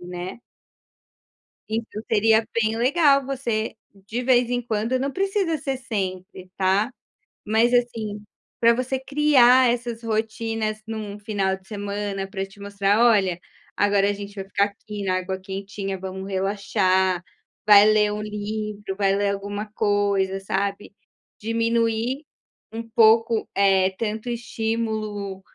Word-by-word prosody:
né. 180 +4 -7 1.3
Então, 220 -1 -4
seria 220 0 +4 0.2
bem 220 +1 0
legal 275 +3 +4
você, 245 -5 -2 0.3
de 235 +4 -3
vez 245 -1 +3
em 245 0 0
quando, 225 +2 -1
não 275 +2 -1
precisa 390 -3 0
ser 270 -2 -2
sempre, 185 -6 -5
tá, 195 +6 +2 0.5
mas, 225 +3 +3
assim, 225 -4 0 0.4
para 235 0 +5
você 255 +2 -1
criar 260 -3 +5
essas 235 -1 -2
rotinas 220 -1 -2
em 225 - -4
um 210 -1 -6
final 200 -3 -1
de 190 0 -26
semana 205 -1 -4
para 195 0 -3
te 195 +1 -18
mostrar: 200 +1 +1
"Olha, 195 -7 +3 0.4
agora 200 -1 +3
a - - +1
gente 200 0 -8
vai 195 -1 -5
ficar 200 +1 +2
aqui 205 0 -7
na 185 -1 +1
água 185 +1 -3
quentinha. 195 +1 -5
Vamos 190 +1 -6
relaxar." 190 -2 +1 0.4
Vai 205 -1 +8
ler 210 -1 +4
um 210 - -4
livro, 210 -1 -4
vai 195 -1 +2
ler 200 0 +1
alguma 200 +1 -4
coisa, 200 -2 +1
sabe, 200 +1 -3 0.5
diminuir 230 +3 0 0.5
um 225 - -4
pouco, 225 0 +4
eh, 195 -1 +4
tanto 220 +1 -3
estímulo 220 -4 -3
210 Hz, 135 wpm, -23 LUFS, 200-230 Hz, 1.3 s, Vai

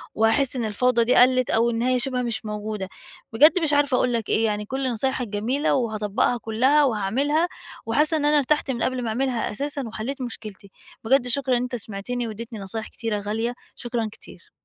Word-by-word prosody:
وهاحس 230 +5 +3
إن 240 -3 -1
الفوضى 235 +3 +2
دي 240 - +2
قلِّت 255 0 +5
أو 230 +1 +2
إن 230 -1 -2
هي 255 +1 +2
شِبه 250 0 0
مش 235 -2 -2
موجودة. 210 -2 -4 0.4
بجد 305 +9 +6
مش 300 -2 +2
عارفة 285 -3 +3
أقول 250 -1 +1
لك 230 -3 -2
إيه، 225 - +2
يعني 210 -1 -1
كل 265 +2 -2
نصايحك 250 +1 -1
جميلة 230 +8 0
وهاطبّقها 220 -1 0
كُلّها 255 +7 +2
وهاعملها، 270 - +1 0.4
وحاسّة 300 +8 +2
إن 295 - -1
أنا 295 0 +4
ارتحت 290 0 +1
من 235 -2 -2
قبل 255 -1 -1
ما 230 - -2
أعملها 250 +1 -1
أساسًا 280 +5 -3
وحلّيت 245 +5 -5
مشكلتي. 210 -5 -8 0.3
بجد 250 +2 +3
شكرًا 255 0 +2
إن 240 - -1
أنت 250 0 -3
سمعتني 230 +2 -3
وادّيتني 225 0 -7
نصايح 205 +3 -5
كتيرة 225 -3 -3
غالية، 220 +4 -2 0.2
شكرًا 240 -2 -3
كتير. - - -15
240 Hz, 190 wpm, -24 LUFS, 220-265 Hz, 0.4 s, بجد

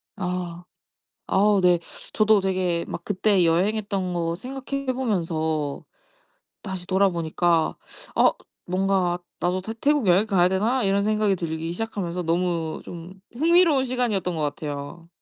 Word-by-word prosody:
아. 180 -3 -4 0.7
아우 205 +1 +4
네. 180 -1 +4 0.3
저도 215 -1 +4
되게 185 -3 0
막 170 - -6
그때 200 -1 +2
여행했던 195 +2 0
거 170 -1 -1
생각해 270 +5 -5
보면서 160 - -1 0.8
다시 190 -3 -6
돌아보니까 175 -3 +1 0.4
'아 - - +5 0.3
뭔가 185 -1 +1 0.2
나도 180 +3 0
태 220 - -5
태국 290 -5 +2
여행 185 +5 +4
가야 185 -4 +3
되나?' 220 +8 +1
이런 195 +1 +2
생각이 210 -1 +1
들기 165 -1 -3
시작하면서 180 -3 -3
너무 165 -1 -1
좀 175 +1 -9 0.2
흥미로운 325 -2 +4
시간이었던 225 -8 -1
것 155 - -2
같아요. 145 +2 -5
185 Hz, 280 characters per minute, -24 LUFS, 170-210 Hz, 0.8 s, 아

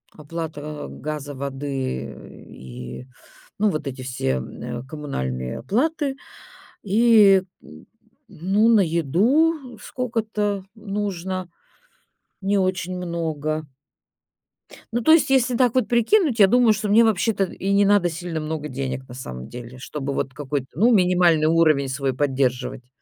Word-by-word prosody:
Оплата 155 -1 -6
газа, 150 -1 -5
воды 135 - -4 0.3
и, 65 - -9 0.5
ну, 210 0 +3
вот 155 -3 -4
эти 130 -1 -5
все, 65 - -2
э, 120 - -7
коммунальные 65 - -4
оплаты. 275 - 0 0.7
И 210 -2 +5 0.2
н 75 +1 -14 0.4
ну, 195 +7 +1
на 225 -3 +6
еду 230 - +1
сколько-то 215 -5 -2
нужно, 195 -4 -4 0.9
не 200 +1 +1
очень 185 -1 -1
много. 155 -3 -3 1.3
Ну, 240 - 0
то 315 - +4
есть, 325 -4 +5
если 255 -2 +3
так 250 -2 +3
вот 255 -4 +2
прикинуть, 240 - +3
я 195 - +8
думаю, 240 +1 +5
что 210 +1 -3
мне 220 +3 +6
вообще-то 215 -1 +2
и 195 +1 -2
не 200 0 +4
надо 200 -3 +4
сильно 165 -1 -4
много 155 -1 -4
денег 130 0 -4
на - - -9
самом 65 - -8
деле, 125 +1 -9
чтобы 140 0 -4
вот 135 - -2
какой-то, 140 -2 -3
ну, 230 +7 +4
минимальный 180 -5 +4
уровень 155 -4 +3
свой 135 0 -1
поддерживать. 130 -3 -1
170 Hz, 130 wpm, -23 LUFS, 140-210 Hz, 1.3 s, я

